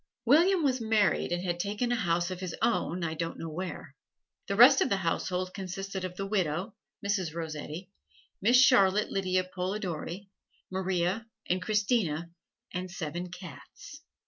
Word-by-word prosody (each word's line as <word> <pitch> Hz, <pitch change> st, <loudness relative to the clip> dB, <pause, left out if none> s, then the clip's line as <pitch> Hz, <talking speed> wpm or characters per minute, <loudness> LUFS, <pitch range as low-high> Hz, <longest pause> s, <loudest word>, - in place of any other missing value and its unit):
William 335 Hz, +8 st, +5 dB
was 260 Hz, -3 st, +1 dB
married 215 Hz, -8 st, +2 dB
and 175 Hz, +1 st, -1 dB
had 175 Hz, -2 st, -2 dB
taken 210 Hz, +6 st, -1 dB
a -, -, +3 dB
house 175 Hz, -4 st, 0 dB
of 185 Hz, -, -5 dB
his 185 Hz, -3 st, -4 dB
own 180 Hz, -6 st, 0 dB
I 160 Hz, -1 st, -1 dB
don't 165 Hz, +1 st, -4 dB
know 165 Hz, -1 st, -6 dB
where. 180 Hz, +3 st, -6 dB, 0.5 s
The -, -, -1 dB
rest -, -, +8 dB
of 275 Hz, -, +2 dB
the 200 Hz, -, +2 dB
household 185 Hz, +1 st, -1 dB
consisted 195 Hz, 0 st, -5 dB
of 180 Hz, -1 st, -4 dB
the 195 Hz, -, -3 dB
widow, 190 Hz, 0 st, -1 dB, 0.3 s
Mrs. 190 Hz, -6 st, -1 dB
Rossetti, 160 Hz, +2 st, -6 dB, 0.5 s
Miss 240 Hz, +5 st, +5 dB
Charlotte 210 Hz, -6 st, +5 dB
Lydia 185 Hz, -1 st, +1 dB
Polidori, 185 Hz, 0 st, -4 dB, 0.4 s
Maria 190 Hz, +3 st, -1 dB, 0.2 s
and 180 Hz, +1 st, 0 dB
Christina 195 Hz, -6 st, 0 dB, 0.4 s
and 185 Hz, +1 st, -3 dB
seven 175 Hz, 0 st, -5 dB
cats. 180 Hz, -, -11 dB
185 Hz, 150 wpm, -29 LUFS, 175-205 Hz, 0.5 s, rest